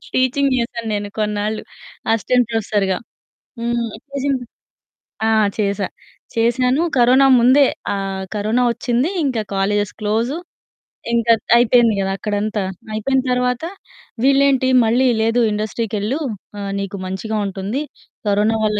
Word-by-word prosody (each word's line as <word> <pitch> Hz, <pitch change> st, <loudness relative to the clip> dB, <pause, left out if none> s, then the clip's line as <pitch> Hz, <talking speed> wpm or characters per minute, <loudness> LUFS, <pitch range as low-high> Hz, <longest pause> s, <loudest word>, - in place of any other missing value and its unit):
Teaching 260 Hz, +2 st, +2 dB
జేశాను 235 Hz, -1 st, -3 dB
నేను 205 Hz, 0 st, -3 dB
కొన్నాళ్ళు, 210 Hz, 0 st, -1 dB, 0.5 s
అసిస్టెంట్ 245 Hz, +2 st, +2 dB
ప్రొఫెసర్‌గా. 205 Hz, -4 st, 0 dB, 0.6 s
హ్మ్. 235 Hz, -1 st, -1 dB, 0.2 s
టీచింగ్. 275 Hz, -2 st, -1 dB, 0.9 s
ఆ! -, -, +3 dB, 0.3 s
చేశా, 200 Hz, -1 st, 0 dB, 0.5 s
చేశాను. 250 Hz, +5 st, +2 dB, 0.2 s
కరోనా 255 Hz, +3 st, +5 dB
ముందే 260 Hz, +4 st, +6 dB, 0.3 s
ఆహ్, 195 Hz, -1 st, -3 dB
కరోనా 215 Hz, +4 st, +1 dB
ఒచ్చిందీ, 245 Hz, +7 st, 0 dB
ఇంక 260 Hz, -5 st, 0 dB, 0.2 s
కాలేజెస్ 205 Hz, +1 st, 0 dB
క్లోజు, 225 Hz, +7 st, 0 dB, 0.8 s
ఇంక 235 Hz, -1 st, +2 dB, 0.2 s
త్ -, -, -5 dB
అయిపోయింది 240 Hz, -1 st, +4 dB
గదా 195 Hz, 0 st, 0 dB
అక్కడంతా. 210 Hz, +1 st, -2 dB, 0.3 s
అయిపోయిన 260 Hz, +5 st, +1 dB
తర్వాత, 250 Hz, +1 st, 0 dB, 0.6 s
వీళ్ళేంటి 275 Hz, -1 st, +4 dB, 0.2 s
మళ్ళీ, 245 Hz, +4 st, +3 dB
"లేదు 225 Hz, +2 st, +2 dB
ఇండస్ట్రీకెళ్ళు 215 Hz, +2 st, -2 dB, 0.4 s
ఆహ్, 200 Hz, -1 st, -4 dB
నీకు 200 Hz, 0 st, -4 dB
మంచిగా 190 Hz, +4 st, -3 dB
ఉంటుంది, 195 Hz, +7 st, -3 dB, 0.5 s
కరోనా 210 Hz, +2 st, +2 dB
వల్ల 210 Hz, -1 st, +1 dB
225 Hz, 115 wpm, -19 LUFS, 205-250 Hz, 0.9 s, ముందే